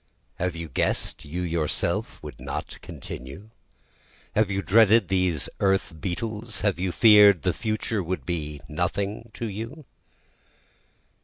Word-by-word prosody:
Have 90 -1 -1
you 85 0 -5
guess'd - - -1
you 85 +5 -4
yourself 85 -3 -1
would - - -9
not - - -6
continue? 70 - -9 0.8
Have 110 -1 +2
you 100 0 -1
dreaded 110 -1 +5
these 90 -5 +1
earth 95 -3 +1
beetles? 110 +4 -2
Have 100 -4 +1
you 90 0 0
fear'd 105 -1 +7
the 90 -2 +2
future 110 -1 -2
would 90 +1 -4
be 75 -4 -3
nothing 100 +7 -2
to 115 - -4
you? 115 +8 -6
95 Hz, 130 wpm, -25 LUFS, 85-110 Hz, 0.8 s, fear'd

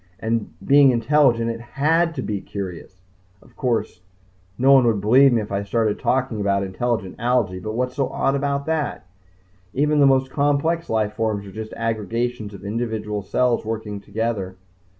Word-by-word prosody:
And 115 0 -2
being 140 0 +6
intelligent 120 -1 +3
it 115 0 -7
had 160 +7 +1
to 130 - -3
be 105 -2 -3
curious. 95 -2 -7 0.4
Of - - -22
course, 110 -7 -2 0.6
no 135 +2 +4
one 135 -2 +6
would 110 -3 +2
believe 130 +7 +5
me 115 -2 +2
if 105 - -10
I 100 0 -1
started 110 +1 0
talking 125 -4 0
about 100 -1 +1
intelligent 95 0 -2
algae. 120 -6 0
But 110 +4 -5
what's 125 +3 -2
so 135 - 0
odd 135 - 0
about 140 0 -1
that? 160 -10 -2 0.7
Even 150 +2 +2
the 140 - +6
most 135 -1 +2
complex 145 +4 0
life 110 -2 0
forms 110 -3 -2
are 100 - -10
just 110 +2 -7
aggregations 115 0 -2
of 100 - -11
individual 110 -1 -3
cells 125 +4 +1
working 110 -2 -4
together. 100 -2 -3
115 Hz, 170 wpm, -22 LUFS, 105-135 Hz, 0.7 s, being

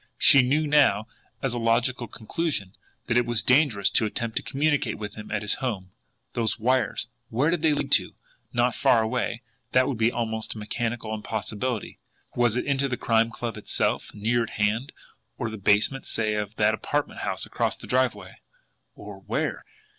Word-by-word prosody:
She 140 - +7
knew 145 +5 +2
now, 140 -9 +4 0.4
as 135 -3 +1
a 120 - -2
logical 120 +2 +1
conclusion, 115 - -3 0.3
that 115 - +1
it 120 - +3
was 120 -4 0
dangerous 125 -7 +4
to 110 - +3
attempt 115 +1 -4
to - - +1
communicate 140 -1 0
with 105 -1 -6
him 105 -1 -9
at 105 -1 -2
his 105 - +1
home. 100 -8 -3 0.4
Those 115 -2 -1
wires! 125 -1 +1 0.2
Where 135 +8 +2
did 175 -3 0
they 155 -2 +3
lead - - -3
to? - - +3 0.4
Not 120 0 +2
far 115 0 +3
away 120 +1 -2 0.3
that 130 0 +5
would 125 -5 -2
be 115 +1 +3
almost 110 -2 -2
a - - -8
mechanical 110 +1 -3
impossibility. 110 +2 -3 0.4
Was 120 -2 +3
it - - -1
into 140 -1 +1
the 125 -2 -2
Crime 115 0 +2
Club 115 -1 -5
itself 105 - -1
near 115 +3 +1
at 115 - -2
hand? 110 +5 0 0.5
Or 115 - -3
the 110 - -6
basement, 105 +7 +2
say, 110 -1 0
of 105 0 -3
that 110 0 +3
apartment 145 +6 -2
house - - -2
across - - -1
the - - -11
driveway? 130 0 -1 0.6
Or - - -10
where? - - -2
115 Hz, 180 wpm, -26 LUFS, 110-130 Hz, 0.6 s, She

